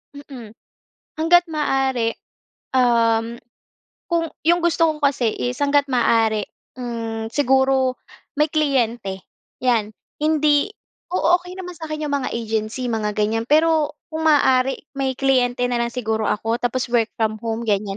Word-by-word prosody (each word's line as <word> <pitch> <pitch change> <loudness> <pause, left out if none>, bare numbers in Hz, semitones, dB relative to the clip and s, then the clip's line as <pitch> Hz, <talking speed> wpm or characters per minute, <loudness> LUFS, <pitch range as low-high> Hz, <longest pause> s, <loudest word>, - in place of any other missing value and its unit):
Mm. 255 -6 -11 0.6
Hangga't 350 +2 +5
maaari, 265 -6 0 0.6
um, 230 -2 +2 0.7
kung 335 -2 0 0.2
‘yong 345 +1 +4
gusto 330 -1 +3
ko 305 -1 -6
kasi 270 -5 +2
is 245 0 -3
hangga't 285 0 +3
maaari, 225 -4 +2 0.3
hmm, 230 -3 -4
siguro 265 -1 +2 0.4
may 300 +1 +3
kliyente 240 - 0 0.4
‘yan. 230 -4 +1 0.3
Hindi 305 +2 +2 0.4
oo, 355 -1 +3
okey 360 +1 -10
naman 360 -1 -7
sa'kin 310 -1 -5
‘yong - - -4
mga - - -3
agency, 225 +2 -3
mga 215 -2 -1
ganyan, 220 +2 0
pero 310 -1 +3 0.2
kung 320 0 0
maaari, 265 -3 +3
may 265 -1 -1
kliyente 250 -2 +1
na 245 -1 0
lang 235 - -2
siguro 220 -3 -2
ako, 225 +2 0
tapos 245 +1 -1
work 230 -2 +3
from 220 -1 0
home, 230 0 -3
ganyan. 200 -2 0
255 Hz, 135 wpm, -21 LUFS, 225-300 Hz, 0.7 s, Hangga't